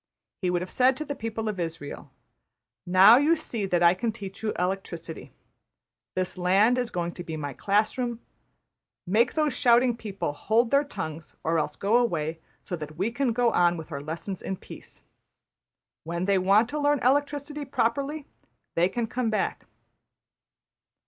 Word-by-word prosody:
He 180 Hz, -, +1 dB
would 180 Hz, 0 st, 0 dB
have 185 Hz, -, -8 dB
said 255 Hz, 0 st, +3 dB
to 305 Hz, -, -4 dB
the 285 Hz, -, -3 dB
people 225 Hz, -3 st, -4 dB
of 210 Hz, -2 st, -2 dB
Israël, 165 Hz, -4 st, -5 dB, 0.8 s
``Now 200 Hz, +9 st, +8 dB
you 325 Hz, +3 st, +4 dB
see 235 Hz, -10 st, -3 dB
that 175 Hz, -2 st, +1 dB
I 170 Hz, 0 st, +7 dB
can 225 Hz, +5 st, -2 dB
teach 195 Hz, -3 st, -8 dB
you 220 Hz, -1 st, -1 dB
electricity; 180 Hz, -3 st, -4 dB, 0.8 s
this 185 Hz, 0 st, -2 dB
land 200 Hz, +8 st, +4 dB
is 245 Hz, -2 st, -1 dB
going 175 Hz, -1 st, -2 dB
to 175 Hz, -, -8 dB
be 160 Hz, -2 st, -5 dB
my 145 Hz, -2 st, -4 dB
class 210 Hz, -, +1 dB
room; 240 Hz, -2 st, -2 dB, 0.9 s
make 225 Hz, +7 st, +2 dB
those 305 Hz, -4 st, +1 dB
shouting 240 Hz, 0 st, +4 dB
people 200 Hz, -9 st, -4 dB
hold 225 Hz, +9 st, +1 dB
their 280 Hz, +1 st, +4 dB
tongues, 165 Hz, -, -7 dB
or 165 Hz, +1 st, +1 dB
else 150 Hz, -1 st, -2 dB
go 210 Hz, +4 st, +2 dB
away; 165 Hz, -9 st, 0 dB, 0.2 s
so 180 Hz, -, -4 dB
that 155 Hz, 0 st, -8 dB
we 195 Hz, +6 st, 0 dB
can 250 Hz, +1 st, 0 dB
go 240 Hz, 0 st, +2 dB
on 175 Hz, -2 st, +3 dB
with 160 Hz, +1 st, -9 dB
our 140 Hz, -2 st, -4 dB
lessons 165 Hz, +5 st, -5 dB
in 190 Hz, -, -4 dB
peace. -, -, -12 dB, 1.0 s
When 170 Hz, +2 st, -3 dB
they 200 Hz, -1 st, +3 dB
want 200 Hz, +5 st, +4 dB
to 300 Hz, -, -3 dB
learn 290 Hz, 0 st, +3 dB
electricity 290 Hz, +2 st, 0 dB
properly, 275 Hz, +3 st, -1 dB, 0.5 s
they 175 Hz, +2 st, +3 dB
can 235 Hz, +4 st, -2 dB
come 240 Hz, +1 st, -2 dB
back.'' 215 Hz, -, -2 dB
205 Hz, 170 wpm, -26 LUFS, 175-245 Hz, 1.0 s, ``Now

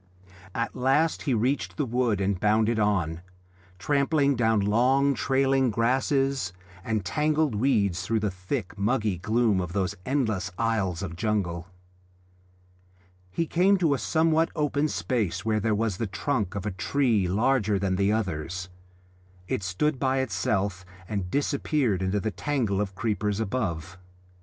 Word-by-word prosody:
At 115 Hz, 0 st, -2 dB
last 135 Hz, +6 st, +2 dB
he 130 Hz, -, +3 dB
reached 125 Hz, +6 st, -1 dB
the 150 Hz, -, 0 dB
wood 120 Hz, -4 st, 0 dB
and 95 Hz, -1 st, 0 dB
bounded 110 Hz, +2 st, +2 dB
on, 90 Hz, -6 st, 0 dB, 0.6 s
trampling 140 Hz, -, +2 dB
down 110 Hz, -2 st, +2 dB
long 125 Hz, +7 st, +3 dB
trailing 135 Hz, +1 st, +2 dB
grasses 130 Hz, -1 st, +1 dB, 0.3 s
and 110 Hz, -4 st, -2 dB
tangled 150 Hz, -, +1 dB
weeds 105 Hz, -6 st, +1 dB
through 110 Hz, +4 st, -1 dB
the 105 Hz, -2 st, 0 dB
thick, 90 Hz, -1 st, -4 dB
muggy 105 Hz, -3 st, 0 dB
gloom 110 Hz, 0 st, +2 dB
of 90 Hz, -1 st, -5 dB
those 95 Hz, 0 st, 0 dB
endless 110 Hz, -7 st, -1 dB
aisles 100 Hz, -6 st, 0 dB
of 85 Hz, -3 st, -5 dB
jungle. 90 Hz, -4 st, -1 dB, 1.6 s
He 165 Hz, -, -1 dB
came 185 Hz, +5 st, +3 dB
to 165 Hz, -6 st, +2 dB
a 135 Hz, -, -1 dB
somewhat 160 Hz, 0 st, +2 dB
open 150 Hz, -1 st, +1 dB
space 115 Hz, -, -2 dB
where 110 Hz, -1 st, +1 dB
there 110 Hz, 0 st, +1 dB
was 105 Hz, -3 st, -1 dB
the 115 Hz, -, -2 dB
trunk 105 Hz, 0 st, -2 dB
of 100 Hz, 0 st, -4 dB
a 105 Hz, -, -1 dB
tree 105 Hz, +2 st, +1 dB
larger 105 Hz, +1 st, +2 dB
than 95 Hz, -1 st, 0 dB
the 100 Hz, +2 st, +2 dB
others; 90 Hz, -3 st, -2 dB, 0.8 s
it -, -, -1 dB
stood 125 Hz, -, -1 dB
by 130 Hz, 0 st, +1 dB
itself 95 Hz, -4 st, -1 dB, 0.2 s
and 100 Hz, -3 st, -3 dB
disappeared 140 Hz, -, 0 dB
into 95 Hz, +2 st, 0 dB
the 110 Hz, +2 st, -2 dB
tangle 115 Hz, -8 st, -1 dB
of 100 Hz, -2 st, -4 dB
creepers 105 Hz, -1 st, -1 dB
above. 95 Hz, -6 st, -3 dB
110 Hz, 145 wpm, -26 LUFS, 95-135 Hz, 1.6 s, he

